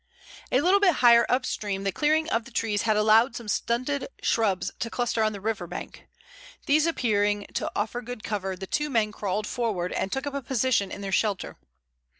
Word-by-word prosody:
A 255 - +3
little 370 +5 +4
bit 375 -6 +4
higher 235 -2 +6
up 255 +1 +1
stream 200 -2 -3
the 195 - 0
clearing 310 +6 +1
of 230 0 0
the - - -11
trees 210 -2 -1
had 215 -2 +1
allowed 220 +3 +4
some 235 -3 -7
stunted 255 +6 -1 0.2
shrubs 195 -4 +1
to 230 - -2
cluster 240 -1 -1
on 215 0 +2
the 205 - -7
river 205 -3 -3
bank. 180 - -8 0.6
These 305 +3 +3
appearing 205 -8 +1
to - - -2
offer 220 +4 -2
good 245 -2 -8
cover, 195 -3 -3
the 190 +1 -7
two 300 +9 -1
men 225 -5 +1
crawled 210 0 -2
forward 210 -7 -2
and 190 - -2
took 270 +2 -2
up 285 - -4
a 280 - -3
position 240 -6 0
in - - -7
their 195 -1 -4
shelter. 200 -2 0
225 Hz, 200 wpm, -26 LUFS, 205-255 Hz, 0.6 s, higher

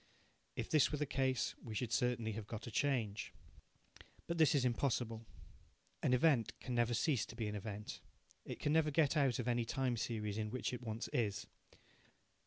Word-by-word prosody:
If - - -2
this 155 - +4
were 150 - 0
the 150 - 0
case, 130 -2 0
we 110 -2 -6
should 120 0 -1
certainly 115 0 +1
have 105 -1 -5
got 110 -1 -6
a 120 - -6
change. 115 -7 0 0.9
But 170 0 -2
this 160 0 +6
is 135 -3 +3
impossible. 115 -2 0 0.7
An - - +2
event 125 -2 +3
can 125 - -4
never 120 0 +2
cease 125 -1 +2
to - - -10
be 115 -2 -2
an 105 - -3
event. 105 0 -5 0.4
It - - -6
can 145 - +1
never 160 -1 +4
get 150 0 +3
out 135 -6 +3
of 125 - -3
any 120 -1 +2
time 125 +1 0
series 110 -2 -2
in 105 0 -1
which 125 +2 -2
it 125 - -4
once 110 -1 -4
is. 100 -4 0
120 Hz, 190 wpm, -37 LUFS, 110-135 Hz, 0.9 s, this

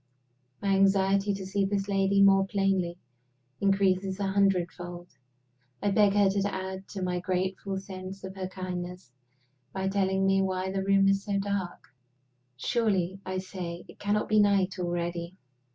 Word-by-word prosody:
My 200 - +1
anxiety 195 +1 +3
to 195 -1 -4
see 195 +1 0
this 195 0 -1
lady 200 0 +3
more 195 -1 +5
plainly 195 -3 0 0.6
increases 195 -1 +1
a 200 - 0
hundred 195 -3 +2
fold. 175 0 -9 0.7
I 205 - 0
beg 200 0 +4
her 205 -1 +4
to 200 +1 0
add 190 0 -5
to 195 -2 -5
my 180 -1 -1
grateful 190 +1 -2
sense 190 0 -8
of 190 0 -6
her 190 -1 -4
kindness 180 -4 -6 0.6
by 190 0 -2
telling 195 -1 +1
me 195 0 +3
why 190 0 -1
the 195 0 -1
room 195 0 +4
is 195 0 +2
so 200 -2 -1
dark 195 -2 -3 0.7
"Surely," 195 - 0
I 185 0 -2
say, 180 -2 -6
"it - - -15
cannot 205 +1 0
be 215 0 +3
night 200 -2 +2
already?" 175 0 -3
195 Hz, 155 wpm, -28 LUFS, 185-195 Hz, 0.7 s, more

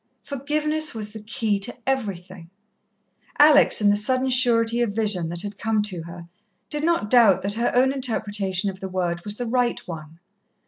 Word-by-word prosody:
Forgiveness 300 +2 -1
was 210 -1 -5
the 220 - -8
key 215 -1 -1
to 200 +5 -3
everything. 190 -9 -4 0.9
Alex, 290 -5 +6
in 205 -1 +4
the - - +3
sudden 255 +5 0
surety 240 -2 +2
of 230 -4 0
vision 205 -7 0
that 170 +1 -4
had 205 0 -7
come 220 -1 0
to 185 -5 -4
her, 170 0 -10 0.4
did 300 0 -2
not 330 -11 0
doubt 230 -7 +5
that 200 +1 -1
her 235 +3 0
own 260 +2 +3
interpretation 205 -7 -1
of 190 - -14
the 190 - -6
word 175 -2 -2
was 205 0 -3
the 245 - -3
right 245 +1 0
one. 160 -2 -9
215 Hz, 180 wpm, -23 LUFS, 190-255 Hz, 0.9 s, Alex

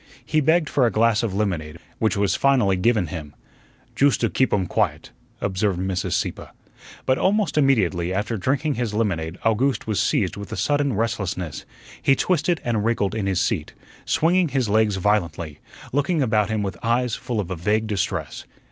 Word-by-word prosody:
He 155 0 +1
begged 160 +2 +3
for 130 -4 +2
a - - 0
glass 115 0 +3
of 110 -5 -2
lemonade, 85 -7 -2 0.2
which 110 -3 +1
was 100 -2 +2
finally 125 -9 +3
given 105 +1 +2
him. 75 -3 -7 0.6
"Joost 140 -4 +3
to 115 - +2
geep 130 - +1
um 95 -3 +1
quiet," - - -1 0.3
observed 95 -1 0
Mrs. 95 -1 -2
Sieppe. - - -2 0.6
But 130 - +2
almost 205 +2 +1
immediately 100 - +2
after 105 +4 -1
drinking 140 +8 0
his 120 -5 -3
lemonade 85 -6 -1
Owgooste 120 +5 +1
was 110 -3 -1
seized 95 0 +1
with 100 -1 -8
a - - -4
sudden 140 +7 +1
restlessness. 100 -7 -3 0.4
He 135 - +4
twisted 175 0 +1
and 115 -4 0
wriggled 110 -3 0
in 110 -3 -2
his 95 -2 +1
seat, 95 -6 -1 0.3
swinging 175 +2 +2
his 135 -4 0
legs 105 0 +2
violently, 85 -6 -1 0.3
looking 145 +2 +1
about 110 -4 +1
him 110 -1 -1
with 95 -3 -4
eyes 120 0 +1
full 120 -1 -3
of 95 -3 -3
a - - -1
vague 105 +6 0
distress. 105 -3 -3
110 Hz, 175 wpm, -23 LUFS, 95-130 Hz, 0.6 s, He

